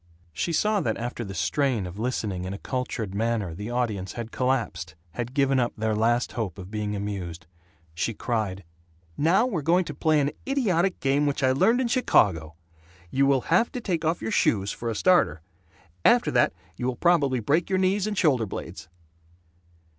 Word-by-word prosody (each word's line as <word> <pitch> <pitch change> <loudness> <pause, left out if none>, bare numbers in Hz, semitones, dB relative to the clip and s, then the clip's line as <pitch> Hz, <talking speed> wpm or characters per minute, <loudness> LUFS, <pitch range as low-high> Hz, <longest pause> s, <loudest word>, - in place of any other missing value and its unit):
She 170 - -2
saw 210 +4 +2
that 110 - -1
after 120 0 -4
the 95 -3 -7
strain 130 -7 0
of 90 +3 -8
listening 110 -6 -2
in 95 +1 -4
a - - -6
cultured 115 -5 -4
manner 110 -4 -1
the 105 +6 -6
audience 110 -6 -2
had 115 -1 -6
collapsed; 115 -11 -1 0.2
had 120 +8 -5
given 135 -2 +3
up 120 -1 0
their 110 0 0
last 120 +3 +1
hope 105 -7 -4
of 95 0 -9
being 105 -1 -2
amused. 95 -5 -5 0.5
She 105 +7 -2
cried, 105 -6 -2 0.5
"Now 175 +10 +3
we're 195 -11 -2
going 175 +5 +2
to 150 - -6
play 155 +2 +2
an 140 0 +1 0.2
idiotic 195 -10 +1
game 140 +2 +2
which 145 0 -1
I 130 - +4
learned 225 - +3
in 250 - +1
Chicago. 90 - +2 0.6
You 135 +1 +3
will 135 -2 +3
have 225 +7 +3
to 250 - -3
take 175 -8 -2
off 160 -3 0
your 110 - -2
shoes, 100 -1 +2
for 120 - -4
a 115 - -2
starter! 105 - +3 0.6
After - - +4
that - - +3 0.3
you 125 - -2
will 130 - -1
probably 145 -5 +2
break 150 - +1
your 190 - +2
knees 190 +2 +1
and 210 -2 -3
shoulder 130 - +2
blades." 90 - -7
125 Hz, 185 wpm, -26 LUFS, 105-160 Hz, 0.6 s, I